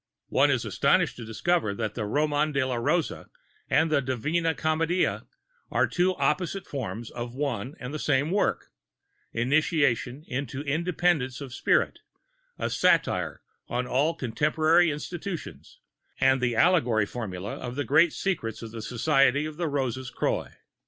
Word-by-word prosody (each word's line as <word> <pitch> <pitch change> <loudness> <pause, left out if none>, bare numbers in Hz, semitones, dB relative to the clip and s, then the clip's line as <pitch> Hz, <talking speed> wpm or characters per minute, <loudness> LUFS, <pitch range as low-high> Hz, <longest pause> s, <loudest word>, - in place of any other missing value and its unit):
One - - +4
is - - +1
astonished - - +2
to 115 - -7
discover 110 0 0
that 110 -2 -3
the 110 -2 -3
Roman 150 +5 +1
de 140 -2 +1
la 130 - -2
Rose 135 +8 +1 0.6
and 160 0 +3
the 145 -2 +3
Divina 150 +6 0
Commedia 160 +4 0 0.4
are - - +2
two 185 +1 +1
opposite 180 +5 0
forms 120 -4 -5
of 120 0 -6
one 135 -2 -3
and 125 +3 -6
the 155 - -3
same 145 +2 +1
work, 200 - 0 0.6
initiation 140 0 +1
into 135 +1 -4
independence 155 -3 0
of 135 -4 -8
spirit, - - +1 0.6
a - - -2
satire - - +1 0.2
on 125 +1 -2
all 145 +6 +1
contemporary 155 +6 +2
institutions, 150 - -6 0.4
and 130 -1 +4
the 120 -2 +1
allegorical 120 - +3
formula 100 -5 -5
of 125 0 -6
the 145 - -1
great 160 +4 +4
Secrets 115 - -3
of 115 - -7
the 115 -1 -7
Society 135 +5 +2
of 155 -1 -7
the 170 -1 -1
Roses 130 -3 -2
Croix. - - -1
140 Hz, 145 wpm, -27 LUFS, 120-160 Hz, 0.6 s, One